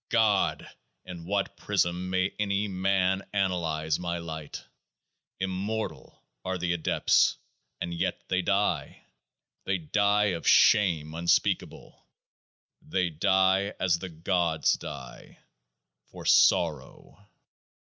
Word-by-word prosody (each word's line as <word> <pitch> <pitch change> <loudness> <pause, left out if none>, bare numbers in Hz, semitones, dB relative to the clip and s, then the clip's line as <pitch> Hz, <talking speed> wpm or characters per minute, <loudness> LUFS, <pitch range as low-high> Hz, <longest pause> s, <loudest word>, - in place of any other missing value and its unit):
God! 110 -4 +1 0.4
in 85 -2 -9
what 100 +2 -2
prism 90 -2 -1
may 95 +1 0
any 100 0 0
man 95 0 +1
analyse 80 -5 0
my 85 -1 -3
Light? 80 -3 -7 0.8
Immortal 95 +4 -4 0.2
are 95 0 -2
the 90 0 -1
adepts; 85 -2 +2 0.4
and 85 - -4
yet 85 - -2
they 95 0 0
die 100 +2 -1 0.3
— - - -53
They 95 0 0
die 100 +4 +1
of 85 -2 -5
SHAME 80 -7 +4
unspeakable; 85 +1 -1 0.8
They 90 -2 -1
die 95 +4 +2
as 90 -2 +1
the 95 - -6
Gods 85 -1 0
die, 65 -3 -8 0.7
for - - -11
SORROW. 85 +5 +1
95 Hz, 105 wpm, -27 LUFS, 85-100 Hz, 0.8 s, SHAME